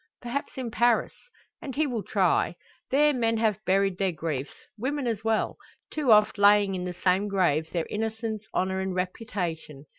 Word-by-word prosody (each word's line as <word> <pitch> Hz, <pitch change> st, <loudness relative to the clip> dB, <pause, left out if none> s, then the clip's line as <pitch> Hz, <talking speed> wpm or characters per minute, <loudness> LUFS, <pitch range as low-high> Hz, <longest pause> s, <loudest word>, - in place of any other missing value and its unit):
Perhaps 245 Hz, +4 st, -4 dB
in 250 Hz, -3 st, -4 dB
Paris? 235 Hz, 0 st, +2 dB, 0.5 s
And 270 Hz, -, -6 dB
he 310 Hz, +2 st, +2 dB
will 245 Hz, -6 st, -2 dB
try. 185 Hz, -4 st, +1 dB, 0.3 s
There 295 Hz, +2 st, +4 dB
men 230 Hz, -3 st, +1 dB
have 215 Hz, -2 st, 0 dB
buried 195 Hz, -1 st, +2 dB
their 195 Hz, -2 st, +1 dB
griefs 155 Hz, -4 st, -4 dB, 0.2 s
women 265 Hz, +5 st, -2 dB
as 225 Hz, -3 st, -2 dB
well: 225 Hz, -1 st, 0 dB, 0.3 s
too 295 Hz, -6 st, +1 dB
oft 210 Hz, 0 st, +5 dB
laying 205 Hz, -1 st, +5 dB
in 180 Hz, -1 st, -3 dB
the 180 Hz, -1 st, -5 dB
same 190 Hz, +3 st, +3 dB
grave 170 Hz, -6 st, +1 dB
their 170 Hz, -2 st, -1 dB
innocence, 220 Hz, 0 st, -3 dB
honour, 190 Hz, +1 st, 0 dB
and 190 Hz, -1 st, -2 dB
reputation. 180 Hz, -6 st, -4 dB
210 Hz, 170 wpm, -27 LUFS, 185-230 Hz, 0.5 s, oft